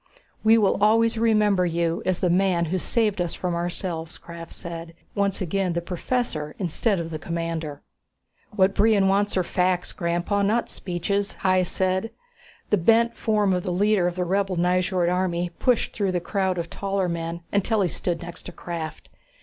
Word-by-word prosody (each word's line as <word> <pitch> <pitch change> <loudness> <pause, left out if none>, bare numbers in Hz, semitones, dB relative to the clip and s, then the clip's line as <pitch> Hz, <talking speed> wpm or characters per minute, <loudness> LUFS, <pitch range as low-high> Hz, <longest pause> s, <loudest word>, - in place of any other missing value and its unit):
"We 220 +1 +6
will 205 -2 +2
always 230 +2 +4
remember 210 -4 +3
you 170 -1 0
as 185 -2 +1
the 180 - +2
man 180 -2 +2
who 185 - +1
saved 210 -1 +1
us 175 -2 -2
from 180 -1 -2
ourselves," 170 -1 -3
Krafft 170 0 -10
said, 165 -1 -7 0.2
once 200 -1 0
again 185 0 0
the 170 - 0
professor 175 -4 -2
instead 195 +2 0
of 165 -1 -4
the 155 - -4
commander. 165 -3 -4 0.7
"What 195 -2 +2
Brion 205 -2 +4
wants 200 +1 +2
are 185 - +3
facts, 180 0 0
Grandpa, 175 +3 -1
not 215 +4 +1
speeches," 200 +3 -2
Hys 185 -1 +3
said. 190 +3 0 0.6
The 210 - +5
bent 230 +6 +3
form 210 -3 +1
of 180 - 0
the 180 - -4
leader 200 0 +2
of 175 - -2
the 180 -1 -1
rebel 195 0 0
Nyjord 180 0 +2
army 180 -1 0
pushed 250 -3 +2
through 195 -3 -1
the 180 - +1
crowd 190 +1 -1
of 170 0 -4
taller 195 -1 -1
men 170 0 -3
until 205 +2 +2
he 190 - +3
stood 170 -1 -3
next 175 0 -8
to - - -6
Krafft. 165 -2 -6
185 Hz, 175 wpm, -24 LUFS, 170-200 Hz, 0.7 s, We